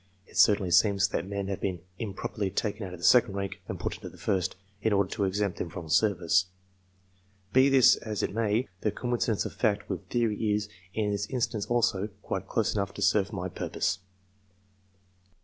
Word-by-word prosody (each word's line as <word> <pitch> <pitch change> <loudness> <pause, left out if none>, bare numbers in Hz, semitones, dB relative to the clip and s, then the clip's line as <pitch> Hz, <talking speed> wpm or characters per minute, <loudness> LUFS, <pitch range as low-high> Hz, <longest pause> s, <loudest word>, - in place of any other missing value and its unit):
It - - -19
certainly 100 -4 +4
seems 100 0 +4
that 85 - -2
men 100 -1 -3
have 100 - -3
been 90 -3 -2 0.2
improperly 100 -2 -3
taken 105 +1 -2
out 90 - -9
of - - -14
the - - -3
second 120 -5 +5
rank 100 0 -4
and - - -5
put - - -3
into - - -8
the - - -16
first, 95 -4 -1 0.3
in 110 0 +2
order 100 -2 +2
to 100 - 0
exempt 100 0 -1
them 85 - -3
from 80 0 -8
service. 90 -2 +3 1.1
Be 130 +2 +6
this 135 -2 +6
as 110 -2 -4
it - - -1
may, 115 +2 +1
the 105 - 0
coincidence 120 0 -1
of - - -5
fact - - 0
with - - -5
theory 110 -3 0
is, 105 0 -3 0.3
in 105 -2 0
this 100 -1 -2
instance 115 -4 -2
also, 110 -4 +1 0.2
quite 95 0 -3
close 110 +1 0
enough 100 -2 -2
serve 100 0 +2
my 95 -4 -3
purpose. 95 +1 -2
100 Hz, 185 wpm, -28 LUFS, 95-110 Hz, 1.1 s, Be